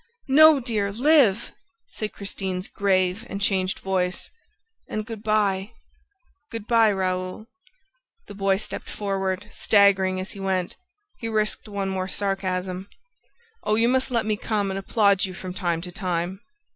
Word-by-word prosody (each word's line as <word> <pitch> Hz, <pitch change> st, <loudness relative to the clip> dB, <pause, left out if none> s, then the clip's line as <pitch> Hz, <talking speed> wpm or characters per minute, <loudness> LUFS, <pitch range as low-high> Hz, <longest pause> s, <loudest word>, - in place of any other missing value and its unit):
"No, 310 Hz, +1 st, +8 dB
dear, 215 Hz, -5 st, -1 dB
live!" 240 Hz, -3 st, +3 dB, 0.4 s
said 215 Hz, -1 st, -5 dB
Christine's 190 Hz, -2 st, -4 dB
grave 190 Hz, 0 st, +1 dB
and 200 Hz, -, -4 dB
changed 190 Hz, -2 st, 0 dB
voice. 185 Hz, -1 st, -2 dB, 0.6 s
"And... 215 Hz, 0 st, -3 dB
good 220 Hz, -2 st, -7 dB
by. 210 Hz, -1 st, +1 dB, 0.8 s
Good 225 Hz, -3 st, -6 dB
by, 230 Hz, -2 st, +4 dB
Raoul 185 Hz, +1 st, -2 dB, 0.4 s
..." -, -, -45 dB
The -, -, -9 dB
boy 195 Hz, -1 st, +1 dB
stepped 210 Hz, -, -7 dB
forward, 195 Hz, -1 st, -2 dB
staggering 195 Hz, -2 st, +3 dB
as 185 Hz, -, -4 dB
he 200 Hz, -, -10 dB
went. 190 Hz, -2 st, -1 dB, 0.4 s
He 230 Hz, -, -4 dB
risked 215 Hz, 0 st, -1 dB
one 200 Hz, -1 st, -2 dB
more 185 Hz, -1 st, -2 dB
sarcasm: 190 Hz, -1 st, -2 dB, 0.7 s
"Oh, 210 Hz, -, +2 dB
you 230 Hz, +2 st, +3 dB
must 260 Hz, +2 st, +1 dB
let 235 Hz, -3 st, 0 dB
me 215 Hz, -1 st, 0 dB
come 205 Hz, -2 st, -1 dB
and 195 Hz, -, -2 dB
applaud 200 Hz, -1 st, +3 dB
you 185 Hz, -1 st, -7 dB
from 185 Hz, 0 st, -6 dB
time 175 Hz, -3 st, -1 dB
to 180 Hz, +1 st, -7 dB
time!" 180 Hz, 0 st, -3 dB
195 Hz, 150 wpm, -24 LUFS, 185-215 Hz, 0.8 s, No